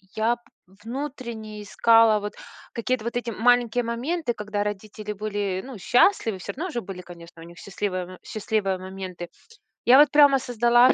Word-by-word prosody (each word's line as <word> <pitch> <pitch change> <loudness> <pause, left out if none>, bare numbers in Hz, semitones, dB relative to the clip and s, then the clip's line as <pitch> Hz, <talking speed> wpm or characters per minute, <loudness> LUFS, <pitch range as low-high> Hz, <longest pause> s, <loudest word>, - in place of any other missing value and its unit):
я 230 +2 +1 0.5
внутренне 235 -4 -6
искала 225 +1 +5
вот 205 0 -5 0.4
какие-то 240 0 -1
вот 235 +1 -2
эти 240 -1 -3
маленькие 245 +1 +2
моменты, 245 +5 -2
когда 210 -1 -3
родители 210 +1 -5
были, 205 -2 -3
ну, 260 -5 -8
счастливы, 230 - +3
всё 185 +3 -6
равно 345 +6 -4
же 240 - -3
были, 185 -1 -8
конечно, 170 -1 -13
у 165 - -10
них 170 0 -14
счастливые 185 -1 -3
м 185 0 -11
счастливые 210 -3 -1
моменты. 185 -2 -7 0.6
Я 250 +2 +8
вот 290 0 +7
прямо 285 -2 +6
создала 240 0 +4
220 Hz, 160 wpm, -25 LUFS, 195-245 Hz, 0.6 s, Я